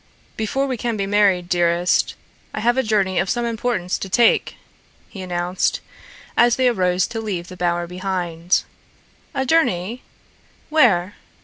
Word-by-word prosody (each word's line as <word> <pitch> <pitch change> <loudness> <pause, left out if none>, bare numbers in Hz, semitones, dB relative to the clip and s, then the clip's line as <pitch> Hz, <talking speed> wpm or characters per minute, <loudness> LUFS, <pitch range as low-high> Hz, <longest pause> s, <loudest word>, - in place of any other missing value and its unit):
"Before 245 +6 -1
we 260 -2 -2
can 230 0 -2
be 195 - -1
married, 195 -3 +2
dearest, 175 0 +1 0.4
I - - -2
have 240 +2 +2
a 265 - +2
journey 200 -5 +1
of 190 +1 -1
some 240 -1 0
importance 225 -5 -2
to 195 - -5
take," 230 +4 +3 0.5
he 195 - -9
announced, 180 0 -1 0.6
as 240 0 +4
they 260 -1 +2
arose 185 -5 +1
to 225 -1 -5
leave 185 -5 -4
the 185 - -9
bower 175 -1 -1
behind. 180 -1 -1 0.7
"A 265 -1 0
journey? 240 - +1 0.7
Where?" 205 - +3
195 Hz, 145 wpm, -21 LUFS, 180-235 Hz, 0.7 s, as